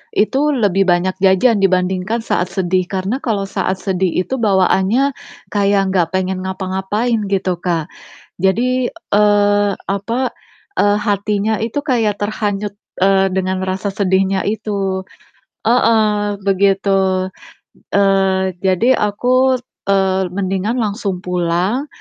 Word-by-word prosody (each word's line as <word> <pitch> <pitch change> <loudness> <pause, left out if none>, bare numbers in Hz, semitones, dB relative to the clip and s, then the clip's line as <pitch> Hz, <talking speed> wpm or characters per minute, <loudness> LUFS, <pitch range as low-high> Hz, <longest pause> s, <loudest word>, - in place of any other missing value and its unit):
itu 240 +6 +2 0.2
lebih 195 -5 +2
banyak 175 +2 +2
jajan 195 +4 +4
dibandingkan 190 +3 +1
saat 180 - 0
sedih. 185 -1 0
Karena 195 +6 -2
kalau 220 -7 -1
saat 190 -1 -1
sedih 190 -1 0
itu 265 - -3
bawaannya 200 +5 +2 0.4
kayak 200 -1 +2
gak 180 -3 +2
pengen 185 0 -1
ngapa-ngapain 190 +5 -1
gitu, 190 -2 -1
Kak. 170 -2 -2 0.5
Jadi, 245 +6 +1
eee, 205 -7 +2 0.2
apa, 230 +6 -2 0.5
eee, 205 0 +3
hatinya 210 0 0
itu 235 +5 -2
kayak 225 -7 +1
terhanyut, 205 -1 -2 0.3
eee, 195 0 +4
dengan 190 0 -1
rasa 190 +2 -2
sedihnya 190 -1 +1
itu. 200 -3 -2 0.6
Heeh, 215 -3 +2
begitu. 195 -1 +1 0.7
Eee, 195 -2 +2
jadi 190 +6 +3
aku, 250 +5 +2 0.3
eee, 190 -1 +2
mendingan 195 +4 -1
langsung 200 -3 -3
pulang, 180 - -1
195 Hz, 110 wpm, -17 LUFS, 190-210 Hz, 0.7 s, jajan